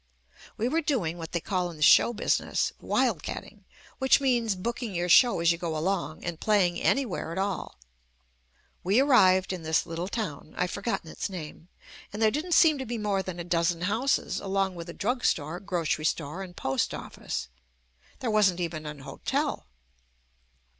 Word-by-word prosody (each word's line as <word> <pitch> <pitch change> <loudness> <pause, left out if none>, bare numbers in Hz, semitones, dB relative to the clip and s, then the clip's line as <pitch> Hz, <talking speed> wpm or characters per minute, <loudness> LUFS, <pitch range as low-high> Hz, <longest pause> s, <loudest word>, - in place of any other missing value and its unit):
We 230 - 0
were 320 +6 +1
doing 195 - -1
what 165 - -7
they 170 - 0
call 180 +1 -1
in 170 - -9
the 150 - -1
show 235 - +7
business 225 - 0
"Wild - - +1
Catting," - - -8 0.3
which 265 +1 +5
means 240 -6 +1
booking 230 +2 -4
your 175 +1 -1
show 240 +3 +6
as 170 0 +4
you 170 - -2
go 165 -3 -2
along 175 -1 -2
and 170 -2 -4
playing 190 -5 +2
anywhere 235 -11 0
at 170 - -5
all. 195 - -3 1.1
We 195 +7 +3
arrived 190 -10 +4
in 180 - -5
this 160 0 +1
little 170 +1 -4
town 185 -9 -5
— - - -18
I've 180 0 0
forgotten 200 -6 -3
its - - -4
name 165 -2 -8 0.2
— - - -18
and 205 - -6
there 220 -1 +4
didn't 320 +7 -2
seem 310 -4 +5
to 265 - -4
be 240 +1 -3
more 205 -3 0
than 185 -2 -6
a - - -3
dozen 170 0 0
houses 220 +9 0
along 195 -1 -1
with 170 -1 -8
a - - -6
drug 245 +4 -2
store, 155 +3 0
grocery 170 -5 -2
store 160 +3 -2
and 180 -2 -9
post 135 -1 -1
office. - - -6 0.7
There 240 -4 -1
wasn't 195 -4 +3
even 160 -3 -4
an 150 -2 -7
hotel. 135 - -3
185 Hz, 185 wpm, -27 LUFS, 170-220 Hz, 1.1 s, show